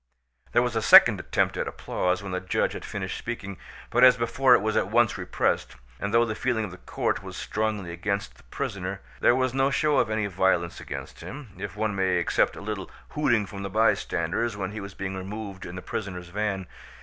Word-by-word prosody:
There 120 - +5
was 120 -2 -2
a 110 - +1
second - - +8
attempt - - 0
at - - -1
applause 90 +2 -1
when 100 - -5
the 90 - -1
judge 90 0 0
had - - -7
finished - - -4
speaking, 100 -6 -6 0.3
but 125 +2 +4
as 130 0 +8
before 125 +2 +4
it - - +2
was 110 0 0
at - - +2
once 115 0 +3
repressed; - - -1 0.2
and 100 - -2
though 115 +1 +4
the 110 - -2
feeling 110 -1 0
of 95 - -8
the 90 - -10
court - - -2
was - - -8
strongly 105 -5 -2
against 100 +4 -2
the - - -20
prisoner, - - -4 0.2
there 120 - +5
was 130 -1 +1
no 135 +1 +3
show 150 +1 +2
of - - +2
any 110 -1 0
violence 95 -3 +1
against - - -7
him, 135 -3 -8
if 100 0 -5
one 110 -1 0
may 95 -1 +2
except 85 - +1
a - - -8
little 105 -2 -4 0.2
hooting 120 -9 +2
from 100 0 -8
the 100 - -4
bystanders 110 0 +1
when 95 -1 -3
he 110 - -6
was 100 -1 -8
being 95 -1 -4
removed 100 0 -6
in 90 - -8
the 95 - -7
prisoners' 90 -4 -5
van. 100 0 -2
105 Hz, 215 wpm, -26 LUFS, 95-115 Hz, 0.3 s, second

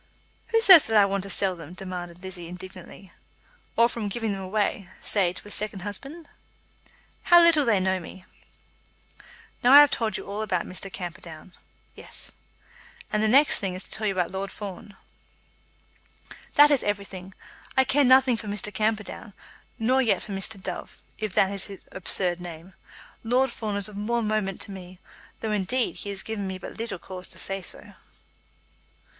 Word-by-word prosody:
"Who 455 - +2
says 370 -7 +10
that 220 -1 +2
I 205 - +7
want 195 0 -1
to - - -7
sell 190 -1 +2
them?" 170 0 -11
demanded 180 -2 -7
Lizzie 180 -2 -6
indignantly. 185 +1 -11 0.7
"Or 230 - +6
from 230 -3 -4
giving 225 +1 -2
them 195 -1 -4
away, 195 -1 -2
say 190 -4 +2
to 185 - -10
a - - -9
second 210 -2 -2
husband." 275 - -6 1.0
"How 345 0 +8
little 335 -4 +5
they 220 -5 +3
know 190 0 0
me!" 185 +2 -11 1.4
"Now 250 +2 +6
I 290 - +12
have 290 - +5
told 220 -3 -1
you - - -8
all 200 +2 -4
about 185 -5 -1
Mr. 190 +1 -6
Camperdown." 175 -1 -8 0.4
"Yes." - - -8 0.8
"And 210 - +2
the 220 - +2
next 275 +6 +5
thing 190 -2 -3
is 185 - -5
to - - -11
tell 220 -1 -2
you 200 - +1
about 180 -2 -1
Lord 195 +1 -4
Fawn." 200 0 -9 1.6
"That 295 +1 +8
is 280 - +4
everything. 195 -2 -4 0.4
I 265 - +7
care 285 +2 +3
nothing 260 -1 +5
for 215 - -8
Mr. 205 0 -4
Camperdown; 215 0 -2 0.4
nor 250 +3 +2
yet 235 - +1
for 210 - -9
Mr. 195 +2 -3
Dove, 185 -1 -5 0.2
if 215 -4 -4
that 195 - +3
is 200 -1 -1
his 195 -2 -10
absurd 180 -1 +1
name. 175 +1 -9 0.5
Lord 250 +3 +2
Fawn 215 -3 -4
is 200 0 +2
of 210 - -11
more 230 +3 -1
moment 210 -3 -1
to - - -4
me, 185 -1 -10 0.4
though, 220 - -2
indeed, 210 +5 -1
he 205 - -5
has 195 -1 -4
given 210 -3 -4
me 190 0 -4
but 185 - -9
little 230 -4 -4
cause 185 +1 -9
to - - -12
say 195 0 -4
so." - - -3
200 Hz, 180 wpm, -25 LUFS, 185-225 Hz, 1.6 s, I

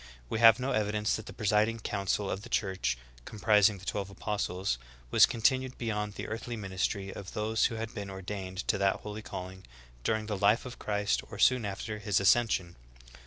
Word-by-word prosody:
'^ - - -16 0.3
We 110 - -1
have 115 +2 +8
no 130 +2 -1
evidence 105 0 +1
that 110 - -7
the - - -7
presiding 110 +1 +1
council 100 0 -1
of 95 - -3
the - - -11
Church, 95 - 0 0.3
comprising 105 - +3
the 95 - -13
twelve 100 -1 -2
apostles, 95 - -2 0.3
was - - +7
continued 130 +2 +1
beyond 105 -3 -2
the - - -5
earthly 115 +2 -5
ministry 95 0 -2
of 100 - -8
those 110 +1 +1
who 115 - 0
had 115 0 -5
been 100 -2 -5
ordained 95 0 -5
to 100 - +2
that 100 0 +2
holy 105 0 -6
calling 95 -2 -7 0.4
during 110 - 0
the 105 -1 -2
life 105 +5 +3
of 125 -1 -8
Christ 105 - 0
or - - -8
soon 125 -4 +4
after 105 +2 -4
His 105 -1 +1
ascension. 100 -4 +2
105 Hz, 190 wpm, -30 LUFS, 95-110 Hz, 0.4 s, have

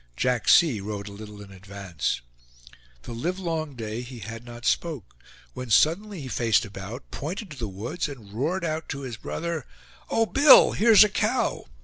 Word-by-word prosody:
Jack 125 -3 0
C. 150 -11 +5
rode 100 0 -5
a - - -8
little 105 0 -10
in 100 - -14
advance; 95 -5 -4 0.8
The - - -7
livelong 165 +1 -3
day 110 0 -5
he 125 0 -9
had 115 +2 -8
not 120 -1 -10
spoke; 155 - -1 0.4
when 125 -1 -7
suddenly 170 - +2
he 135 - -7
faced 115 -4 +1
about, 105 +5 -9
pointed 175 +6 -5
to 145 - -9
the 115 - -3
woods, 115 - -4
and 110 -8 -11
roared 165 - -1
out 160 0 -3
to 140 - -4
his 125 -4 -6
brother: 165 +2 -4 0.4
"O 225 - +2
Bill! 280 +4 +7
here's 220 0 +7
a 210 - +2
cow!" - - 0
125 Hz, 170 wpm, -25 LUFS, 105-165 Hz, 0.8 s, Bill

